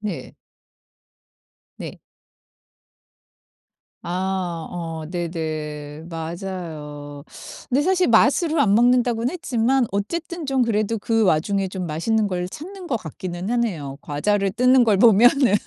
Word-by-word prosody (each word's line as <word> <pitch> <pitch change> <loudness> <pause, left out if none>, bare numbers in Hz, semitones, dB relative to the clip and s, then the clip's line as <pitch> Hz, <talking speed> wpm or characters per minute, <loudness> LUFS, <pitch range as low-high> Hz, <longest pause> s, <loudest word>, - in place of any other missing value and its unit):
네. 205 -5 -5 1.4
네. - - -8 2.0
아. 180 -2 -3
어. 175 -1 -5 0.3
네네. 155 -3 -4
맞아요. 160 -4 -6 0.5
근데 265 +3 +2
사실 370 +1 +2
맛으로 290 +8 +3
안 205 -8 +4
먹는다고는 245 0 +3
했지만 260 -5 +1
어쨌든 335 - -3
좀 270 -1 +1
그래도 225 -1 0
그 225 +1 +1
와중에 190 +2 +1
좀 185 -1 -5
맛있는 205 +8 0
걸 180 -2 -2
찾는 365 - -9
것 255 - 0
같기는 175 +2 -6
하네요. 175 - -2
과자를 195 +7 0
뜯는 250 +3 +4
걸 215 -4 +3
보면은. 235 +3 +5
200 Hz, 225 characters per minute, -22 LUFS, 170-245 Hz, 2.0 s, 보면은